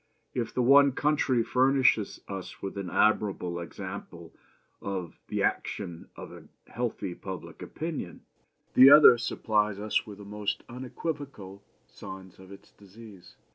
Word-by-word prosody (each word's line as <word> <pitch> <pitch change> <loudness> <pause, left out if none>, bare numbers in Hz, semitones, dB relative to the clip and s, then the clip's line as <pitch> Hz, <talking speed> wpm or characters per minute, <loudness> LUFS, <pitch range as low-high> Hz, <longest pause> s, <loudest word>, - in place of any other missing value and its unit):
If 120 -3 -3
the 125 - 0
one 140 +2 +6
country 140 -4 +1
furnishes 130 -4 +2
us 95 -2 -7
with 95 - -6
an 100 -2 -5
admirable 95 -5 +1
example 85 - -8 0.5
of 95 -4 -5
the - - -2
action 85 -5 -3
of - - -10
a - - -12 0.2
healthy 115 -6 -4
public 95 0 -9
opinion, 155 - -6 0.5
the 130 +2 +9
other 140 -5 +9
supplies 105 -3 0
us 105 +2 -1
with 105 -2 -9
the 100 - -11
most 105 0 -4
unequivocal 130 - -7 0.3
signs 95 -1 -11
of 95 0 -14
its 100 - -14
disease. 100 -2 -15
105 Hz, 135 wpm, -28 LUFS, 95-125 Hz, 0.5 s, the